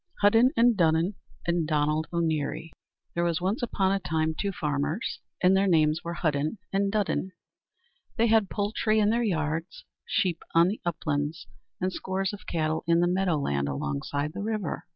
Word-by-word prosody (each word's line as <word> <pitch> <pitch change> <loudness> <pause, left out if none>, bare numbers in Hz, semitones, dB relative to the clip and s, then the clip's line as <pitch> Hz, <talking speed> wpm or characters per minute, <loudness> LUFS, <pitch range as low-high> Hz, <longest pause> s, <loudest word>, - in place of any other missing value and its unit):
Hudden 225 +5 +6
and 235 0 +5
Dudden 165 +1 +2 0.3
and 170 -2 0
Donald 150 +1 +1
O'Neary 165 -1 -1 0.4
There 170 - 0
was 170 -2 +1
once 190 +7 -1
upon 195 -5 +1
a 195 - +1
time 160 -2 0
two 200 +5 -2
farmers, 150 +3 -2 0.2
and 185 +1 +6
their 195 +1 +3
names 155 -2 +3
were 170 0 -4
Hudden 155 +2 -1 0.2
and 195 0 +1
Dudden. 200 -2 -1 0.8
They 230 - +4
had 220 -3 +3
poultry 215 +1 0
in 210 0 +4
their 235 +1 +1
yards, 165 -4 -2 0.2
sheep 180 -5 0
on 170 +2 +6
the 210 - -4
uplands, 155 -1 -2 0.3
and 185 0 -1
scores 190 +2 -2
of 205 - -10
cattle 155 -1 -1
in 170 0 +4
the 175 - +3
meadow 180 -2 +1
land 70 - -1
alongside 70 - -3
the - - -5
river. 215 -5 -3
170 Hz, 170 wpm, -27 LUFS, 155-200 Hz, 0.8 s, Hudden